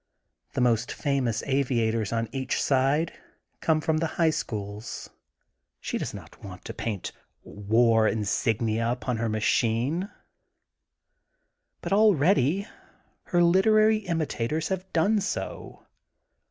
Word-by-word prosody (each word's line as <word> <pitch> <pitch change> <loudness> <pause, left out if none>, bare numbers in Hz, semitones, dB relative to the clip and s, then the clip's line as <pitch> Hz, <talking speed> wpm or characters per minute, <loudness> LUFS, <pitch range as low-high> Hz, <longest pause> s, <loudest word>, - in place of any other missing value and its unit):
The - - -1
most 120 -1 +2
famous 135 -6 -1
aviators 115 -6 0
on 115 0 -1
each 130 -1 -2
side 140 +4 +1 0.5
come 160 -1 +2
from 160 0 +1
the 165 - 0
High 165 -2 +4
Schools* 105 -5 -5 0.7
She - - -3
does - - -3
not - - -12
want 90 -2 -10
to - - -6
paint 105 -5 -4 0.3
war 110 +2 +2
insignia 110 +1 0
upon 125 -1 -2
her 115 0 -1
machine. 115 - 0 1.7
But - - -2
already 195 - +3 0.6
her 175 -1 +2
literary 215 +5 +4
imita 160 -10 -2
tors 155 +1 -2
have 190 0 -4
done 200 +6 +2
so. 205 - -5
130 Hz, 115 wpm, -26 LUFS, 115-170 Hz, 1.7 s, High